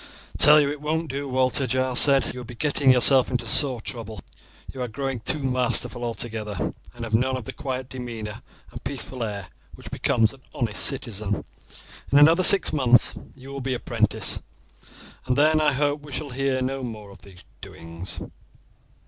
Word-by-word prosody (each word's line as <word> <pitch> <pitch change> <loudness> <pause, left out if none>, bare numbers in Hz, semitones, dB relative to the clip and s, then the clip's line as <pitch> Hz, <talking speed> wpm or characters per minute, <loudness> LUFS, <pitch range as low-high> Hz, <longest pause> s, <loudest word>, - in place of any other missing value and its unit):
"I - - -8
tell 150 +1 +8
you 145 - +2
it 145 -1 -7
won't 160 +1 -2
do, 140 +1 -5
Walter," 130 +1 0
Giles 130 -1 +1
said. 140 -2 +5
"You 125 - -8
will - - -7
be 120 +1 -11
getting 140 +1 +2
yourself 130 +1 +5
into 125 -2 -2
sore 125 +1 +3
trouble. 110 -3 -6 0.5
You 130 - -7
are 125 - -2
growing 135 +2 -4
too 125 +7 -2
masterful 125 -2 0
altogether, 110 -4 -4 0.2
and 120 - -8
have 110 -1 -6
none 130 +3 +1
of 125 - -8
the - - -7
quiet 130 -1 -5
demeanour 115 -5 -7 0.3
and - - -10
peaceful 130 -2 -5
air 100 -4 -6 0.3
which - - -12
becomes 110 +1 +1
an 135 - -18
honest 120 - -2
citizen. 110 -6 -2 0.7
In 140 - +4
another 160 +5 +6
six 190 -3 +6
months 125 -4 +3 0.2
you 135 0 -13
will 140 0 -6
be 130 0 -2
apprenticed, - - 0 0.9
and 125 - +1
then 155 +1 +3
I 150 -1 +3
hope 145 +2 -1
we 145 0 -13
shall 145 +1 -5
hear 130 0 -1
no 135 +1 -3
more 110 -5 -8
of - - -15
these 95 -3 -16 0.2
doings." 85 +3 -8
130 Hz, 180 wpm, -24 LUFS, 115-140 Hz, 0.9 s, tell